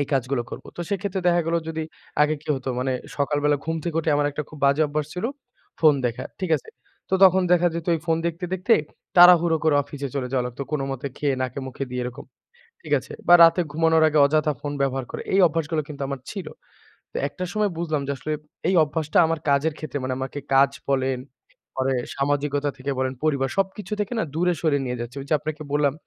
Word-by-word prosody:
এই 145 - 0
কাজগুলো 130 -1 0
করব। - - -8
তো - - -5
সেক্ষেত্রে 195 -1 -2
দেখা 175 0 +4
গেল 165 - 0
যদি 160 0 -3 0.4
আগে 150 +1 +3
কি - - -17
হতো 130 0 -6
মানে 130 0 0 0.2
সকাল 145 +1 0
বেলা 145 0 +4
ঘুম 160 +1 -1
থেকে 165 -2 -2
উঠে 160 -1 0
আমার 145 0 +2
একটা 150 +2 -4
খুব 155 - -12
বাজে 140 +3 +4
অভ্যাস 150 0 -2
ছিল 180 - -4 0.6
ফোন 155 -3 +6
দেখা। 120 +2 -4 0.2
ঠিক 185 -3 -2
আছে? - - -15 0.4
তো - - +3
তখন 190 0 +6
দেখা 175 0 +4
যেত 170 -1 -4
এই 160 - -3
ফোন 165 -1 +2
দেখতে, 170 +2 -3
দেখতে 185 +5 +1 0.4
তাড়াহুড়ো 175 -2 +8
করে 155 -2 +4
অফিসে 140 0 -6
চলে 130 -3 -2
যাওয়া 125 -2 +1
লাগত। 125 +2 -8
কোনোমতে 135 -2 -2
খেয়ে 140 -2 0
নাকে-মুখে 130 +1 -4
দিয়ে 125 0 -2
এরকম। 125 +3 -7 0.6
ঠিক - - -6
আছে? - - -10 0.2
বা 175 - +9
রাতে 165 +2 +6
ঘুমানোর 160 +1 +3
আগে 155 0 +1
অযথা 155 +1 +2
ফোন 145 -1 -4
ব্যবহার 135 -1 -1
করে। - - -5
এই 195 - +5
অভ্যাসগুলো 160 -1 -1
কিন্তু 140 -2 -7
আমার 140 -2 -4
ছিল। 195 -5 -6 0.7
তো - - -35
একটা 180 - -6
সময় 210 -1 +1
বুঝলাম 155 -4 -1
যে - - 0
আসলে 155 +4 -3 0.3
এই 185 - +3
অভ্যাসটা 155 0 -2
আমার 165 0 -1
কাজের 140 +3 +2
ক্ষেত্রে। 145 -2 -5
মানে 130 0 -1
আমাকে 135 +2 -4
কাজ 135 +1 +5 0.2
বলেন, 130 -1 +1 0.6
পরে 130 0 0 0.2
সামাজিকতা 145 +1 0
থেকে 140 +2 -3
বলেন, 130 0 0
পরিবার। 140 -3 +1
সবকিছু 195 +2 -1
থেকে 210 +3 -2
না - - +1
দূরে 180 +2 +2
সরে 155 -4 +2
নিয়ে 125 0 -3
যাচ্ছে। 120 +3 -6
ওই - - -9
যে - - +2
আপনাকে 155 +1 -5
বললাম। 145 -2 +2
150 Hz, 210 wpm, -24 LUFS, 135-165 Hz, 0.7 s, বা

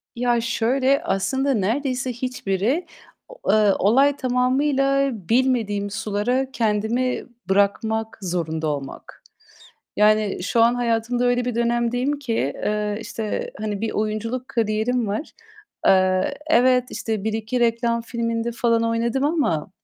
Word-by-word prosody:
Ya, 240 -1 +1
şöyle, 260 +6 +1
aslında 265 - 0
neredeyse 250 +4 -1
hiçbiri 250 - -1 0.4
o - - -2
eee, 215 -2 +4
olay 270 +8 +4
tamamıyla 275 +2 +1 0.2
bilmediğim 225 -5 +1
sulara 225 +5 -1
kendimi 230 +2 0 0.2
bırakmak 220 +3 +1
zorunda 160 -4 -2
olmak. 140 -2 -6 0.7
Yani 210 -3 +3
şu 230 +5 +2
an 235 +1 +4
hayatımda 240 0 0
öyle 245 0 +2
bir 245 -1 -2
dönemdeyim 240 +4 0
ki, 250 -5 -3 0.2
eee, 210 0 -2
işte, 220 -1 -4
hani, 210 -1 -3
bir 225 - -2
oyunculuk 220 +4 -2
kariyerim 225 +1 0
var. 210 +10 -4 0.5
Eee, 185 +7 +3
evet, 255 -4 +4
işte, 220 -3 -3
1-2 220 +2 -2
reklam 235 0 +1
filminde 230 0 -2
falan 230 -1 +1
oynadım 230 +3 0
ama, 285 - 0
230 Hz, 120 wpm, -22 LUFS, 210-255 Hz, 0.7 s, eee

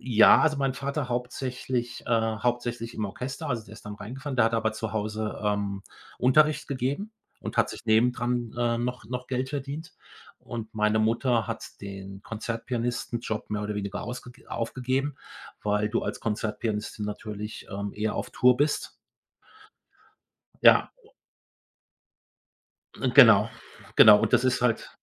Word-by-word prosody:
Ja, 115 -3 +6
also 155 -2 +3
mein 135 -1 0
Vater 140 -1 -3
hauptsächlich 125 0 -3
äh, - - -4
hauptsächlich 115 +1 0
im 110 - -2
Orchester. 130 +9 -5
Also, 120 -4 -2
der 105 - -14
ist 110 - -13
dann 105 -1 -6
reingefahren, 130 +7 -6
der 115 - +5
hat 115 - 0
aber 110 -1 +1
zu 110 -1 -4
Hause, 110 0 -3
ähm, 100 -1 -1 0.4
Unterricht 150 +4 +3
gegeben 140 - -2 0.3
und - - -6
hat - - +3
sich - - -8
neben 115 +2 +4
dran, 120 -1 -2
äh, 120 -1 +1
noch 120 0 -3
noch 125 +2 -5
Geld 130 0 -2
verdient 145 +4 -5 0.4
und 115 -2 -7
meine 105 0 +2
Mutter 115 0 +1
hat - - -7
den 95 0 -8
Konzertpianistenjob 115 0 -3
mehr 105 -1 -2
oder 105 0 -3
weniger 100 0 -4
ausge 125 0 -7 0.2
aufgegeben, 130 +4 -2 0.5
weil 105 0 +1
du 115 - -1
als - - -4
Konzertpianistin 105 -1 -3
natürlich, 105 0 -6
ähm, 100 0 -4
eher 105 0 -1
auf - - -4
Tour 125 0 +4
bist. 150 +3 0 1.7
Ja - - +7
u 445 - -20 1.9
und 130 -2 0
genau, 115 -7 +8 0.5
genau 105 -1 +10
und 110 - 0
das 130 - +4
ist 130 0 +2
halt 120 -2 +1
115 Hz, 150 wpm, -27 LUFS, 105-125 Hz, 1.9 s, genau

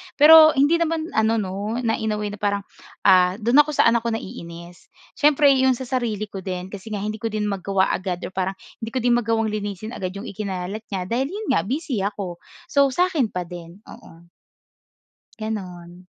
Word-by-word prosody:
Pero 310 +1 +8
hindi 290 +5 +4
naman 330 -1 -1
ano 220 +1 +2
'no 200 +3 -4
na, 225 -1 +1
in 220 -1 -1
a - - -4
way 210 -1 -3
na 205 - -8
parang, 200 -1 -1 0.4
ah, 185 -1 +5
dun 235 +6 +3
ako 300 0 +4
sa - - +4
anak 235 0 +2
ko 230 - 0
naiinis. 170 -3 -9 0.3
Siyempre 290 -1 +5
'yun 260 -1 +3
sa 260 - -6
sarili 235 -5 -2
ko 195 - -6
din 185 0 -5
kasi 200 +1 -9
nga 205 - -3
hindi 215 0 -4
ko 230 - -2
din 215 -1 -3
magawa 195 0 0
agad 185 -1 -3
or - - -5
parang 190 +1 -2 0.2
hindi 225 0 -6
ko 255 - 0
din 245 - +3
magawang 225 -1 0
linisin 210 0 -5
agad 185 -5 -5
'yung 200 - -7
ikinalat 200 +1 -5
niya 185 -2 -2
dahil 255 +4 0
'yun 430 -1 -3
nga 165 - +1
busy 270 -3 -2
ako. 200 -4 -5 0.3
So 280 -1 +4
sa 365 +1 +2
akin 280 -9 +1
pa 180 -3 -4
din, 175 +3 -11
oo. 165 +1 -15 1.1
Gano'n. 180 -5 -7
210 Hz, 200 wpm, -22 LUFS, 185-245 Hz, 1.1 s, Pero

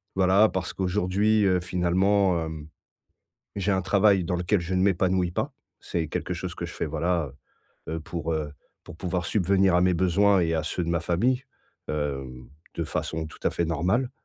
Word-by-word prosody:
voilà 95 +3 +5
parce 90 -1 -3
qu'aujourd'hui, 95 +4 +1
heu, 95 -1 +3
finalement, 90 0 +1
hem, 80 -1 -7 0.9
j'ai 100 +1 0
un 95 - +2
travail 100 0 +3
dans 90 +2 -1
lequel 90 +3 +1
je 85 +2 -3
ne 90 - +2
m'épanouis 95 -1 +2
pas. - - -3 0.3
C'est 85 -2 -2
quelque - - -3
chose - - -5
que - - -5
je - - -9
fais, - - -2
voilà, 80 -1 -1 0.6
heu 80 - -2
heu, 80 - -3
pour, 80 0 -4
heu, 75 -2 -3 0.3
pour - - -11
pouvoir 90 0 -2
subvenir 95 -2 +2
à 90 - +4
mes 90 0 +3
besoins 95 +3 +3
et 85 -1 +1
à 80 - 0
ceux 90 +2 -2
de - - -4
ma 85 -1 +1
famille, 115 +10 +1 0.5
hem, 70 -4 -4 0.3
de - - -2
façon 80 0 -3
tout 75 - -13
à - - +2
fait 85 - -1
normale, 90 - 0
90 Hz, 190 wpm, -26 LUFS, 80-95 Hz, 0.9 s, voilà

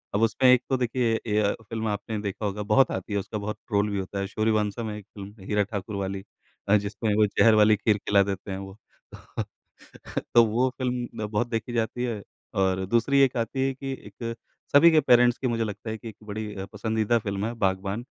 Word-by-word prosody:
अब 105 - +1
उसमें 120 +3 +4
एक 125 -1 +5
तो 135 - +2
देखिए 120 -1 0
ए 105 -1 +1
य 100 -1 +2 0.2
फ़िल्म 110 -1 -2
आपने 105 +1 -3
देखा 100 +1 -4
होगा, 105 +1 -2
बहुत 105 +6 +4
आती 95 +3 -4
है, 100 - +1
उसका 105 +2 -5
बहुत 105 +1 -4
ट्रोल 105 -2 +1
भी 100 -1 -2
होता 95 +1 -4
है, 100 - -2
सूर्यवंशम 110 +1 0
है 105 - -5
एक 105 - -11
फ़िल्म 100 0 -10
हीरा 105 0 +1
ठाकुर 100 0 -5
वाली 95 0 -3 0.5
अ, 105 - +6
जिसमें 105 +1 -2
वो 105 0 +5
ज़हर 110 +2 +4
वाली 105 0 +6
खीर 105 0 +1
खिला 100 0 +3
देते 100 0 -4
हैं 95 - -3
वो। 95 +1 -9 0.4
तो - - -6 0.9
तो 120 - +9
वो 120 +4 +1
फ़िल्म 125 -2 -2 0.2
न 105 - -2
बहुत 110 +3 -1
देखी 115 +1 -3
जाती 120 +1 -1
है 115 -4 -2 0.3
और 95 -1 +1
दूसरी 120 +7 +2
एक 130 -2 +3
आती 130 +3 0
है 135 - -1
कि 135 +1 -6 0.2
एक 115 +3 -5 0.4
सभी 165 +4 +8
के 155 - +6
पेरेंट्स 120 -2 +5
की 130 - -2
मुझे 115 -1 0
लगता 105 +1 -5
है 110 - -3
कि 115 - -8
एक 110 - -12
बड़ी 105 0 -5
अ, 95 - -5
पसंदीदा 110 +2 +1
फ़िल्म 100 -1 -3
है 115 - -4
बागबान 95 +5 -1
105 Hz, 225 wpm, -26 LUFS, 100-120 Hz, 0.9 s, तो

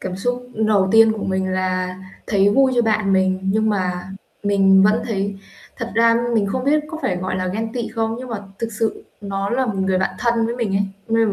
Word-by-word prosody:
Cảm 185 -1 -5
xúc 245 +4 -3
đầu 215 -3 +2
tiên 225 0 +6
của 220 - -5
mình 190 0 -1
là 185 0 -1 0.3
thấy 200 -2 +3
vui 265 +4 +3
cho 240 - +3
bạn 215 -3 +1
mình, 190 0 +2
nhưng 215 +3 +1
mà 180 -3 -2 0.3
mình 195 -1 +4
vẫn 210 +3 +3
thấy 200 -2 -2 0.4
thật 230 0 -5
ra 230 0 +4 0.2
mình 210 -3 +2
không 255 +6 -2
biết 300 +2 +3
có 320 - -6
phải 185 -9 0
gọi 185 +1 -3
là 185 0 -2
ghen 220 +4 -3
tị 235 -2 -3
không? 225 0 -2
Nhưng 255 0 -7
mà 230 - -3 0.2
thực 230 - -2
sự 220 +1 -2 0.2
nó 200 -1 -3
là 260 +2 +1
một 220 - -2
người 190 -1 +1
bạn 190 - -1
thân 235 -1 +1
với 235 +1 -3
mình 210 -5 -1
ấy, 200 - +2 0.3
nên 225 0 +3
là 205 - 0
210 Hz, 235 wpm, -20 LUFS, 190-230 Hz, 0.4 s, tiên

